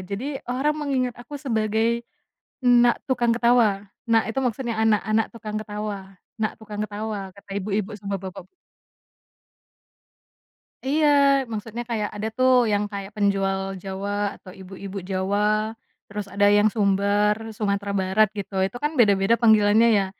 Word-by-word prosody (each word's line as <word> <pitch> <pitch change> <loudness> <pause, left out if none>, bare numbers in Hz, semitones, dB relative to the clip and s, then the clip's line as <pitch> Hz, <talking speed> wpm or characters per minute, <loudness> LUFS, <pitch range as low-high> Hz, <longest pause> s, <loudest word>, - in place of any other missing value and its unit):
Jadi, 220 +10 -5
orang 270 +5 +1
mengingat 255 -4 -1
aku 265 +5 -8
sebagai 225 -3 0 0.7
"Nak 245 -1 +5
Tukang 245 -2 +1
Ketawa". 230 -4 +3 0.2
Nak 225 -1 +4
itu 270 - 0
maksudnya 245 -1 -2
anak, 220 -2 +3
anak 215 0 +1
tukang 215 -2 -7
ketawa, 205 -2 -5 0.2
nak 215 - -2
tukang 210 -1 -6
ketawa 205 -2 -5
kata 200 +1 -19
ibu-ibu 205 +1 -2
sama 200 -1 -4
bapak 190 -1 -8 2.4
Iya, 300 +3 +2 0.4
maksudnya 225 +2 -5
kayak 215 -3 -1
ada 210 +1 -3
tuh 255 0 +4 0.2
yang 205 0 +1
kayak 200 -1 -5
penjual 195 -1 +1 0.2
Jawa, 200 +1 -3
atau 185 - -13
ibu-ibu 190 +1 -9
Jawa 210 +3 0 0.3
terus 205 0 -5
ada 205 0 +3
yang 210 +1 +4
Sumbar, 205 0 +2 0.2
Sumatera 200 -1 -1
Barat 190 +3 +3
gitu, 200 0 -6
itu 195 +6 -2
kan 300 - +1
beda-beda 200 -1 +4
panggilannya 220 0 +5
ya. 195 - +1
210 Hz, 135 wpm, -24 LUFS, 200-230 Hz, 2.4 s, Nak